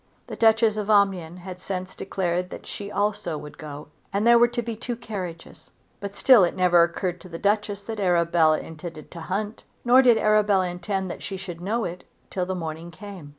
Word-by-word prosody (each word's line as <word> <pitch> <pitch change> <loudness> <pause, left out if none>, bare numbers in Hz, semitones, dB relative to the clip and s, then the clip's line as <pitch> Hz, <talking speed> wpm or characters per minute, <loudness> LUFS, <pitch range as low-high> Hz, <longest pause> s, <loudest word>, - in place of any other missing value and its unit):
The - - -7
Duchess 225 -1 +4
of 210 0 -3
Omnium 190 -5 +2
had 180 0 -9
since 185 0 -5
declared 180 -2 -2
that - - -9
she 200 -1 -7
also 205 -6 -1
would 150 0 -10
go, 150 -1 -8 0.2
and 200 +3 0
there 235 0 +7
were 240 - +6
to 240 0 -3
be 230 -1 -4
two 240 +2 -4
carriages. 195 -8 -8 0.3
But 200 0 -6
still 250 -7 +6
it 175 - +1
never 180 -2 +5
occurred 175 +1 -1
to 185 - -12
the 165 - -6
Duchess 205 +1 0
that 220 0 -5
Arabella 170 -4 +3
intended 160 -1 -9
to 170 - -8
hunt. 205 +6 -3 0.2
Nor 250 +2 +7
did 245 -3 +5
Arabella 210 -4 +3
intend 185 +1 -3
that - - -8
she 195 - -5
should 180 -3 -8
know 220 +6 -1
it 175 +1 -6 0.3
till 180 -2 -2
the 185 - -2
morning 165 -1 -5
came. 185 -3 -10
190 Hz, 200 wpm, -25 LUFS, 175-210 Hz, 0.3 s, there